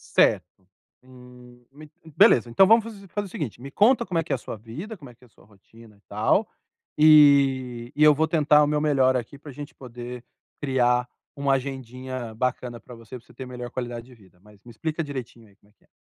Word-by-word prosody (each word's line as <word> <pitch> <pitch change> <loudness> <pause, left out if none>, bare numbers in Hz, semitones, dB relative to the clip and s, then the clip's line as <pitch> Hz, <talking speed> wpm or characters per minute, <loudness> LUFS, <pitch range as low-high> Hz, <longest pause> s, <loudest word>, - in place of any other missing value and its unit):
Certo. - - +4 0.6
Hum, 125 -1 -17
me 150 +1 -14 0.2
beleza. 120 0 +5
Então 155 +12 +5
vamos 225 +2 +4
faz 215 -3 -10
fazer 205 +2 -4
o - - -15
seguinte, 140 - -6
me 135 - -8
conta 220 - +3
como 175 -2 -3
é 165 - +1
que 165 - -9
é - - +2
a - - -4
sua 120 - -8
vida, 125 - -9
como 145 -9 -13
é - - -15
que 125 - -22
é - - -21
a - - -29
sua - - -24
rotina 105 +1 -20
e - - -30
tal, 110 - +1 0.5
e 135 -5 +4
e 150 - -4
eu 150 0 +7
vou 160 +3 +2
tentar 150 -2 +4
o - - +1
meu 150 0 0
melhor 135 -4 +2
aqui 125 +3 -7
pra 145 +1 -12
gente 145 +3 -10
poder 125 -1 -9 0.4
criar 125 -3 +1 0.3
uma 140 -1 0
agendinha 130 -2 -6
bacana 125 0 -3
pra 120 +3 -13
você, 115 +2 -11
pra 120 - -19
você - - -19
ter 130 - -8
melhor 125 -1 -8
qualidade 120 -2 -6
de 125 0 -17
vida. 95 -5 -23
Mas 105 0 -20
me 120 - -13
explica 160 +7 -4
direitinho 120 -6 -8
aí, 100 - -25
como 105 - -29
é - - -31
que - - -36
é? - - -32
130 Hz, 230 wpm, -24 LUFS, 120-150 Hz, 0.6 s, eu